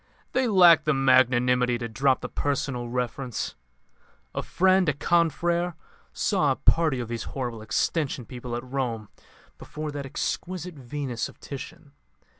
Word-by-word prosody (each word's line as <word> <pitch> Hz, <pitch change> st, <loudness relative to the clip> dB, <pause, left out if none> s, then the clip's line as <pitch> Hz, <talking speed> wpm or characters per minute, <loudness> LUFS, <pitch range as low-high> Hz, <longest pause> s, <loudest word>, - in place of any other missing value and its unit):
They 260 Hz, -1 st, +1 dB
lack 175 Hz, -7 st, +6 dB
the 155 Hz, -2 st, +2 dB
magnanimity 125 Hz, -2 st, +3 dB
to 120 Hz, -1 st, -4 dB
drop 130 Hz, +4 st, +1 dB
the -, -, -4 dB
personal 135 Hz, -4 st, -2 dB
reference. 125 Hz, 0 st, -3 dB, 0.8 s
A -, -, -2 dB
friend, 185 Hz, -2 st, +3 dB
a -, -, +2 dB
confrère, 170 Hz, +3 st, +1 dB, 0.4 s
saw -, -, +1 dB
a -, -, +1 dB
party 155 Hz, -6 st, +2 dB
of 120 Hz, -, -4 dB
these 115 Hz, 0 st, -4 dB, 0.2 s
horrible 120 Hz, -4 st, -3 dB
Extension 130 Hz, +4 st, -1 dB
people 125 Hz, -1 st, -6 dB
at 120 Hz, -, -4 dB
Rome 125 Hz, -5 st, -3 dB, 0.5 s
before 155 Hz, 0 st, -6 dB
that 140 Hz, -1 st, -5 dB
exquisite 180 Hz, +5 st, -3 dB
Venus 130 Hz, -3 st, -4 dB
of -, -, -17 dB
Titian. 145 Hz, +2 st, -9 dB
135 Hz, 140 wpm, -26 LUFS, 125-160 Hz, 0.8 s, lack